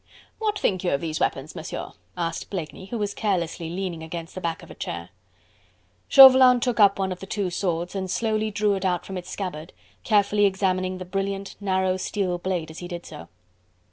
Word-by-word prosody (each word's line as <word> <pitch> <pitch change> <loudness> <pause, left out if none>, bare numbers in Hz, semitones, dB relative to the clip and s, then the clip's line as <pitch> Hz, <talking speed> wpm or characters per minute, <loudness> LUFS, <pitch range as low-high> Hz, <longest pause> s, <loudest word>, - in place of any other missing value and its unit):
"What 425 -2 0
think 185 - 0
you 180 - +1
of 140 - -4
these 155 -2 -3
weapons, - - -1
Monsieur?" - - -6 0.3
asked 165 -1 -3
Blakeney, 185 0 -6
who 235 - -4
was 205 -2 -2
carelessly 170 -5 -1
leaning 175 -2 -4
against 165 +1 -7
the 185 - -6
back 165 -2 -3
of - - -12
a - - -8
chair. 85 0 -6 1.0
Chauvelin 260 -2 +9
took 240 -1 -1
up 200 -1 +6
one 190 -1 -1
of 180 - -5
the 195 - -9
two 195 -2 -2
swords 175 -1 -2
and 190 -1 -3
slowly 215 +1 0
drew 210 0 +1
it 195 - -2
from 185 0 -1
out - - -2
its 180 - -11
scabbard, 175 -4 -5 0.3
carefully 205 -1 +3
examining 185 -1 0
the 185 - -7
brilliant, 195 +1 -3
narrow 190 -2 +1
steel 185 -2 -2
blade 175 -3 -2
as 160 - -9
he 175 - -6
did 175 -1 -7
so. 85 - -10
190 Hz, 200 wpm, -25 LUFS, 175-205 Hz, 1.0 s, Chauvelin